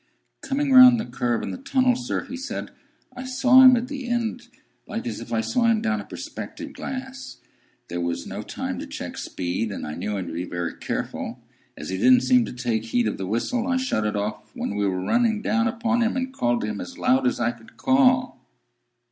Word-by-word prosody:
"Coming 280 +1 -1
round 255 -2 +9
the 220 - -3
curve 120 -1 -1
in - - -3
the - - -6
tunnel, 260 -2 +2
sir," 245 0 -3
he 265 - -7
said, 270 +2 -5 0.4
"I 255 - -6
saw 260 0 +5
him 255 -1 +9
at 240 +1 -1
the 270 -3 -6
end, 240 0 -2 0.4
like 230 +4 -5
as 240 - -4
if - - -9
I 115 -1 +1
saw 235 - 0
him 230 -1 +4
down 220 0 -1
a - - -11
perspective - - -8
glass. 265 - -7 0.5
There 85 0 -4
was 85 0 -2
no - - -5
time - - -5
to - - -6
check - - -6
speed, 95 +5 -3
and - - -5
I 75 - -5
knew 100 +5 -3
him 95 - -3
to 85 - -7
be 85 +2 -3
very 85 -1 -4
careful. - - -4 0.4
As - - -7
he 95 - -2
didn't 125 +5 +6
seem 125 -2 +4
to - - -7
take 120 -3 -2
heed 120 0 +1
of 105 - -3
the 95 - -3
whistle, 230 - -1
I 260 -1 +1
shut 250 - 0
it 105 - -2
off 105 +1 -3
when - - -3
we 105 -1 +1
were 90 -1 -2
running 230 -3 +2
down 230 +1 +2
upon 230 +1 0
him, 235 +3 +1
and 260 0 -3
called 120 - 0
to - - -2
him 105 -1 -4
as 90 - -8
loud 130 0 +2
as - - 0
I 120 0 +1
could 120 -2 -17
call." 255 -1 +3
220 Hz, 225 wpm, -24 LUFS, -, 0.5 s, round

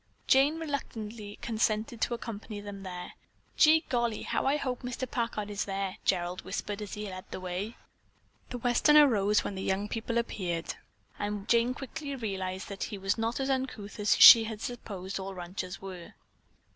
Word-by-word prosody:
Jane 280 +4 +4
reluctantly 225 -9 -5
consented 220 0 0
to 240 - +1
accompany 220 -2 -7
them 205 -1 -8
there. 180 -2 -7 0.4
"Gee 315 +1 +6
golly, 235 -3 0
how - - -1
I 280 +2 +3
hope 255 -4 -3
Mr. 250 +1 -4
Packard 230 -4 -2
is 205 - -2
there," 195 -1 -3
Gerald 180 0 0
whispered 205 0 -4
as 210 - -5
he 210 0 -5
led 185 -1 -7
the - - -6
way. 185 +5 -4 0.7
The 250 - -4
Westerner 290 +5 +6
rose 210 -3 +2
when - - -3
the 190 - -5
young 195 +2 -1
people 230 +2 -2
appeared 180 -7 -2 0.5
and 205 -1 -3
Jane 235 +2 +3
quickly 280 +1 -6
realized 190 -5 -4
that 200 -1 -4
he 205 - -6
was 195 +3 -1
not 230 +3 -1
as 270 0 0
uncouth 255 -6 -3
as 210 0 +3
she 225 -1 +11
had 220 -1 -5
supposed 200 -6 -5
all 190 0 -6
ranchers 180 +1 -6
were. 185 -3 -8
210 Hz, 170 wpm, -30 LUFS, 195-240 Hz, 0.7 s, she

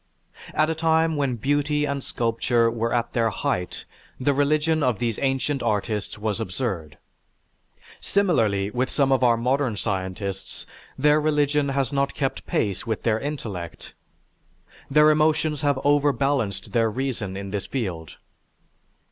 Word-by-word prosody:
At 155 +1 +3
a 160 - 0
time 160 0 +2
when 140 -4 0
beauty 145 +4 +1
and 140 -2 -3
sculpture 115 0 +1
were 115 0 -1
at 120 -1 0
their 115 -2 +2
height 90 -4 -3 0.3
the 140 +2 +2
religion 155 +3 +2
of 125 -6 +2
these 115 -3 -2
ancient 135 0 0
artists 105 0 -1
was 105 0 -2
absurd. 95 - -4 1.0
Similarly, 110 - +1
with 125 +3 -1
some 140 -2 +1
of 130 -1 +3
our 120 -2 +5
modern 125 0 0
scientists, 95 0 -4 0.3
their 150 +2 +4
religion 150 -1 +2
has 135 -1 -1
not 140 0 0
kept 135 -2 -2
pace 100 +1 -1
with 110 -2 -2
their 110 -1 +2
intellect. 110 - -6 1.0
Their 150 +2 +6
emotions 155 -1 +2
have 145 -2 +1
overbalanced 140 -8 +1
their 115 -2 +2
reason 115 -5 -3
in 100 0 -6
this 100 -2 -3
field. 90 - -4
130 Hz, 140 wpm, -24 LUFS, 110-145 Hz, 1.0 s, Their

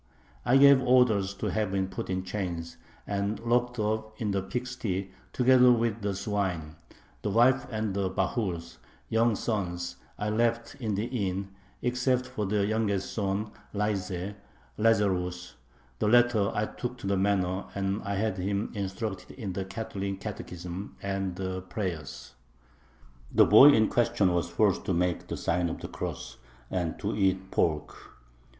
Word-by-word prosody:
I 125 +2 +5
gave 140 -1 +8
orders 120 -6 +3
to - - -2
have 105 -3 -1
him 95 -1 +1
put 95 - -6
in 95 0 -1
chains 85 -4 -4 0.3
and 100 +1 -2
locked 120 +1 +1
up 110 0 -2
in 105 -3 -1
the 100 -1 0
pig 125 +6 -3
sty 105 -7 -3 0.2
together 125 0 +6
with 115 -2 +1
the 100 -1 -1
swine; 95 -6 -2 0.5
the 105 - -1
wife 125 +5 +4
and 110 -3 -2
the 95 -1 0
bahurs 90 - -2 0.3
[young 115 0 +3
sons] 90 -6 -2 0.2
I 105 - -2
left 115 +1 0
in 110 -5 -1
the 105 +3 -1
inn, 100 -6 -2 0.3
except 125 +1 +1
for 105 -4 -3
the 100 0 +1
youngest 105 -2 0
son 105 0 -1 0.2
Layze 100 -2 -2 0.4
[Lazarus]. 90 -5 +1 0.5
The - - +1
latter 120 -3 +4
I 105 - 0
took 125 +3 -5
to 120 - -9
the 100 0 +1
manor, 95 -1 +1
and 100 +1 -1
I 100 -1 -3
had 100 -1 -1
him 100 +3 -1
instructed 95 -1 -4
in 100 -7 -4
the 95 +1 -3
[Catholic] 100 -1 -4
catechism 90 -2 -6
and 95 -2 -2
the 95 0 -3
prayers. 90 -4 -5 1.0
The - - +6
boy 120 +7 +9
in 110 -6 +5
question 105 -6 +2
was 85 -1 0
forced 105 -4 +2
to 95 - 0
make 90 0 0
the - - -4
sign 85 +1 0
of - - -5
the - - -6
cross 65 0 -6 0.3
and 90 -3 -1
to 105 - -2
eat 95 -1 +1
pork. 75 -3 0
100 Hz, 155 wpm, -28 LUFS, 95-110 Hz, 1.0 s, boy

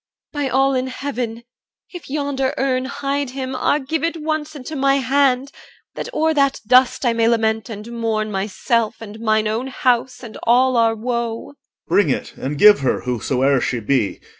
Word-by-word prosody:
by 290 -2 -1
all 270 +1 +2
in 255 0 -1
Heaven, 245 -3 -4 0.5
if 350 -5 -9
yonder 280 -1 -1
urn 260 -1 0
Hide 275 0 -2
him, 260 0 -5
ah! 285 - +2
give 300 +2 -3
it 335 0 -1
once 310 0 -3
into 290 +2 -7
my 275 0 +2
hand, 270 0 +1 0.4
That - - -6
o'er 320 0 +1
that 275 -2 +2
dust 255 +3 +4
I 240 - +3
may 230 0 +2
lament 225 -1 +1
and 220 +1 -8
mourn 220 -2 -2
Myself 210 +3 -1
and 220 -1 -10
mine 215 -1 +1
own 225 +5 -2
house 250 -1 0
and 225 -3 -9
all 250 +2 +3
our 230 -1 +3
woe! 235 0 -3
OR. - - -32 0.3
Bring 200 -7 +3
it - - -3
and 140 +3 -4
give 210 +5 +7
her, 135 -2 0
whosoe'er 125 +2 0
she 125 - -1
be. 115 -2 0
250 Hz, 180 wpm, -20 LUFS, 220-275 Hz, 0.5 s, give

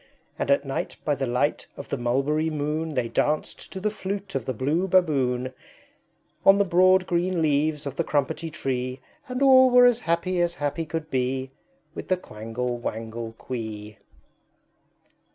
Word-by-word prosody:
And - - -2
at 140 0 +3
night 135 - -3
by 150 - +2
the 135 -1 -2
light 125 +5 0
of - - -8
the - - -1
Mulberry 135 +6 0
moon 155 +1 -2
They 125 -2 0
danced 150 +6 -1
to 190 - -5
the 210 +2 -1
Flute 200 -1 -5
of 130 -4 -2
the 130 - -2
Blue 150 - 0
Baboon, 130 -9 +2 0.9
On 195 - +7
the 200 - +3
broad 185 +1 +4
green 175 0 0
leaves 150 -1 +1
of 140 -1 -5
the 170 - +1
Crumpetty 150 +2 -1
Tree, 130 -4 -3 0.3
And 255 +1 -2
all 260 -1 +7
were 250 0 +7
as 245 -1 +4
happy 175 -1 0
as 175 0 0
happy 150 +1 -2
could 160 0 -5
be, 130 +1 -1 0.4
With - - -7
the 185 - +2
Quangle 120 -3 -5
Wangle 115 0 -5
Quee. 110 -3 -7
150 Hz, 165 wpm, -25 LUFS, 125-180 Hz, 0.9 s, On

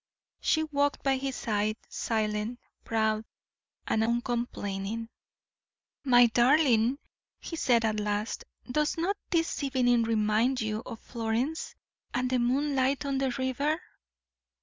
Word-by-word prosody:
She 315 - +2
walked 285 -2 0
by 270 -1 +2
his 270 0 -3
side, 215 0 -1
silent, 215 +1 -2 0.2
proud, 220 -1 0 0.6
and 220 - +1
uncomplaining. 230 -3 -2 0.9
"My 245 -3 +7
darling," 245 0 +4 0.4
he 330 - -6
said, 240 -7 +3
at 215 -1 0
last, 210 +1 -2 0.3
"does 300 +4 +1
not 360 +5 0
this 330 -3 0
evening 250 -4 +3
remind 225 +3 +2
you 220 0 -2
of 225 - -7
Florence, 235 +6 -2 0.4
and 250 +1 0
the 255 - +2
moonlight 270 +2 +1
on 275 -1 0
the 270 -1 +1
river?" 280 +4 0
245 Hz, 120 wpm, -29 LUFS, 220-275 Hz, 0.9 s, My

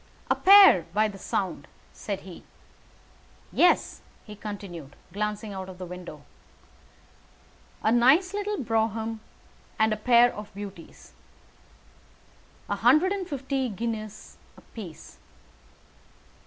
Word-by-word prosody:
"A - - +4
pair, 385 - +7
by 215 +1 +3
the 200 -2 -9
sound," 185 -8 -3 0.3
said 200 -2 -5
he. 185 -2 -12 1.1
"Yes," 355 - +2 0.2
he 210 - -10
continued, 195 -9 -8 0.2
glancing 210 +1 -3
out 190 -1 -7
of 185 - -10
the 185 - -7
window. 175 -4 -10 1.6
"A 220 - +3
nice 270 - +4
little 415 0 -2
brougham 225 - -1 0.6
and 220 0 +2
a - - -3
pair 240 +2 +4
of 210 0 -9
beauties. 200 -4 -10 1.5
A - - -2
hundred 365 +5 +4
and 385 -2 -3
fifty 270 -2 -2
guineas 215 0 -6 0.2
apiece. 185 -9 -12
215 Hz, 110 wpm, -26 LUFS, 195-250 Hz, 1.6 s, pair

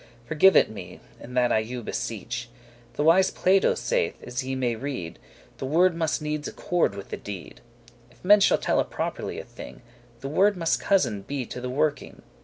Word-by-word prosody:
Forgive 160 +8 +5
it - - +6
me, 90 -4 -9 0.2
and 125 +1 -8
that 125 -1 +3
I - - +4
you 120 +2 -5
beseech. 115 +1 -4 0.5
The 145 - 0
wise 185 +4 +5
Plato 190 +1 +3
saith, - - -1
as 125 +1 -4
ye 130 +1 -3
may 125 -3 0
read, 115 -9 -5 0.4
The 135 - -3
word 170 +4 +3
must 160 -2 -1
needs 150 0 -3
accorde 175 - 0
with 100 - -9
the - - -4
deed; 100 -4 -9 0.5
If 120 - -20
men 205 +2 +7
shall 195 - +4
telle - - +1
properly - - -4
a - - -6
thing, - - -11 0.4
The 135 - -4
word 195 +7 +3
must 165 -2 +1
cousin 125 - +1
be 130 +5 -4
to 125 - -7
the 125 - -4
working. 145 +3 -2
135 Hz, 190 wpm, -25 LUFS, 120-170 Hz, 0.5 s, men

